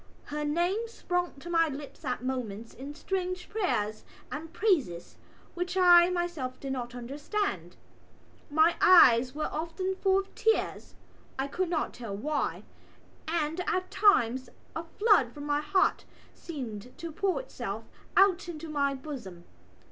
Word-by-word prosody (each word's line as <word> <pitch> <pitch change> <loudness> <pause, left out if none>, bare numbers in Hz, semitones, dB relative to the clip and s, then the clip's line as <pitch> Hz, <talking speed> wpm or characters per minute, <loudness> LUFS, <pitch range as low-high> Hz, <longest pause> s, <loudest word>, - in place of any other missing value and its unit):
Her 300 +1 -4
name 350 +9 0
sprang 355 -6 -2
to 345 - -8
my 330 -1 +4
lips 290 +2 -8
at 250 -3 -2
moments 230 -4 -4
in 280 +3 -8
strange 365 +1 -3
prayers 215 - -1 0.3
and 315 +2 -6
praises 300 - 0 0.4
which 360 +1 -3
I 350 -1 +7
myself 345 -8 -3
did 270 -1 -4
not 245 -1 -5
understand. 290 - -3 0.7
My 315 +3 +4
eyes 255 -8 +7
were 305 - -1
often 335 +4 -2
full 380 0 +2
of 390 0 -3
tears 445 0 0 0.4
(I 270 - 0
could 355 +5 -2
not 330 -3 -1
tell 220 -5 -6
why) 290 +6 -2 0.6
and 325 0 -1
at 370 0 -1
times 260 - +3 0.3
a 325 - -3
flood 405 - +4
from 290 - -8
my 290 0 +1
heart 375 +7 +2 0.3
seemed 250 - -7
to 335 -1 -6
pour 385 +3 0
itself - - -5 0.3
out 385 -2 +4
into 325 -1 -7
my 280 -2 +1
bosom. 245 - -8
310 Hz, 140 wpm, -29 LUFS, 260-365 Hz, 0.7 s, I